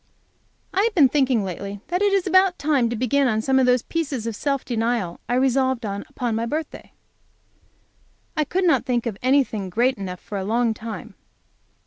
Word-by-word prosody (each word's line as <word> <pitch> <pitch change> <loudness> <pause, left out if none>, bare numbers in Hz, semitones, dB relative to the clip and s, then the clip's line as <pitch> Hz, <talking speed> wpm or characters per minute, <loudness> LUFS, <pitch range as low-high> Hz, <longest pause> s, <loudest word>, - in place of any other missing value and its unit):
I 385 - +2
have 445 0 0
been 285 -7 +6
thinking 260 -5 +2
lately 195 +2 -5
that 360 +2 0
it 410 -1 +3
was 390 -2 +2
about 375 -1 +4
time 285 -6 +1
to 235 - -2
begin 260 +4 +2
on 220 -3 +1
some 265 +4 +2
of 255 - +3
those 250 -1 +3
pieces 280 -8 -3
of 230 -2 -3
self 275 +3 -2
denial 230 -6 -1
I 245 - +1
resolved 260 -1 +1
on 200 -1 -4
upon 240 -2 -3
my 230 +1 -1
birthday. 310 +4 -5 1.4
I 305 - +2
could 365 +6 -1
not 340 -3 +3
think 245 -3 -1
of 230 -4 -2
anything 255 -7 +1
great 240 +6 +1
enough 180 -2 -5
for 205 - -6
a - - -3
long 230 +3 +1
time. 220 0 -8
250 Hz, 190 wpm, -23 LUFS, 220-280 Hz, 1.4 s, been